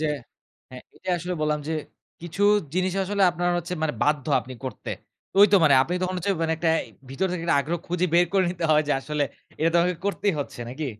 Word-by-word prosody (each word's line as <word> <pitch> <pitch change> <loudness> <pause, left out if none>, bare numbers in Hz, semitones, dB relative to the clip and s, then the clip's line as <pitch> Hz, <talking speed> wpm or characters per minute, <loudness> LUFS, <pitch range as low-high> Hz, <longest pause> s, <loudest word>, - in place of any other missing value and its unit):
যে 155 - 0 0.6
হ্যাঁ 125 0 -10
এটাই 185 - -4
আসলে 180 +1 -4
বললাম 150 0 0
যে, - - -1 0.5
কিছু 175 +4 -4 0.3
জিনিস 185 0 +1
আসলে 200 +1 0
আপনার 175 +1 -1
হচ্ছে 175 +1 -4
মানে 155 -1 +1
বাধ্য 150 -1 +1
আপনি 130 0 -10
করতে। 130 -5 -6 0.4
তো - - -13
ঐ - - +11
তো 200 - +8
মানে 145 - +6
আপনি 175 +6 -3
তখন 185 0 -1
হচ্ছে 200 - -1
মানে 160 - +1
একটা 165 0 0 0.4
ভিতর 165 +8 -1
থেকে 175 -2 -3
একটা 170 - +3
আগ্রহ 165 +5 -2
খুঁজে 180 +1 0
বের 175 +1 +5
করে 195 -1 +3
নিতে 175 -1 -4
হয় 155 0 +5
যে - - +3
আসলে 150 +1 -2 0.4
এইটা 160 +2 +3
তো 175 - +3
আমাকে 180 +1 +1
করতেই 200 0 0
হচ্ছে, 135 - -7
নাকি? 145 +5 -4
170 Hz, 225 wpm, -25 LUFS, 150-180 Hz, 0.6 s, ঐ